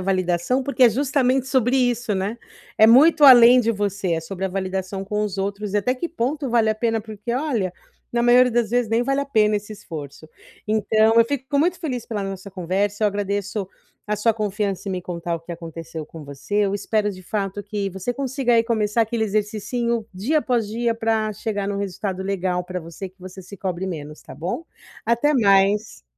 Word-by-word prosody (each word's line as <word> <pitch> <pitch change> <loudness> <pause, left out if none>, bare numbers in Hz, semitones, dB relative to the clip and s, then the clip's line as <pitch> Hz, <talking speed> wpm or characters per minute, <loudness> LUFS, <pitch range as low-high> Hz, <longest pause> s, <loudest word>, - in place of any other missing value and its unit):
validação, 185 +6 0
porque 275 0 0
é 240 - +8
justamente 265 +1 +1
sobre 260 -1 +2
isso, 245 -3 +1
né, 195 +4 -2 0.4
é 220 - +7
muito 295 +7 +6
além 250 -1 +9
de 230 -1 +1
você, 200 -4 -1
é 165 - -2
sobre 190 +3 -6
a - - 0
validação 190 0 -3
com 210 +2 -2
os 200 -2 -4
outros 200 +1 -3
e - - +4
até 230 +5 +1
que 300 +7 -4
ponto 280 -2 -2
vale 230 -2 +3
a 215 - +2
pena 225 0 0
porque, 215 +1 -6
olha, 240 - -1 0.4
na 235 - +1
maioria 250 +1 +5
das 235 -2 0
vezes 245 -1 +1
nem 230 +1 +2
vale 275 +2 0
a 280 - -1
pena 215 -5 +3
esse 205 +1 -6
esforço. 155 -6 -9 0.4
Então 220 +1 +3
eu 230 - +5
fico 280 +2 -2
muito 350 +4 +1
feliz 255 -8 -4
pela 210 -3 -4
nossa 195 0 -6
conversa, 195 +3 -1
eu - - +5
agradeço 200 0 -3 0.4
a 210 - 0
sua 225 +2 +2
confiança 205 -2 -2
em - - -2
me 180 -1 -4
contar 170 -1 -4
o - - -11
que 165 - -13
aconteceu 165 -1 -7
com 155 0 -11
você, 140 +8 -8
eu 195 - -1
espero 210 +1 0
de 185 - -11
fato 200 +1 -3
que 205 0 -3
você 190 +6 -3
consiga 265 -2 0
aí 230 - +5
começar 225 -1 +1
aquele 225 0 -1
exercicinho 215 +3 -1
dia 230 +12 0
após 245 -6 0
dia 230 +2 -1
para 225 -1 0
chegar 205 -1 -3
num 200 - -2
resultado 190 -1 -3
legal 185 -2 -1
pra 180 0 -5
você, 170 +3 -8
que 185 +1 -29
você 185 +1 -9
se 200 +3 -11
cobre 185 -1 -3
menos, 150 -4 -6
tá - - -11
bom? 175 - -4 0.4
Até 235 +6 +2
mais. 205 - +2
210 Hz, 205 wpm, -22 LUFS, 190-240 Hz, 0.4 s, além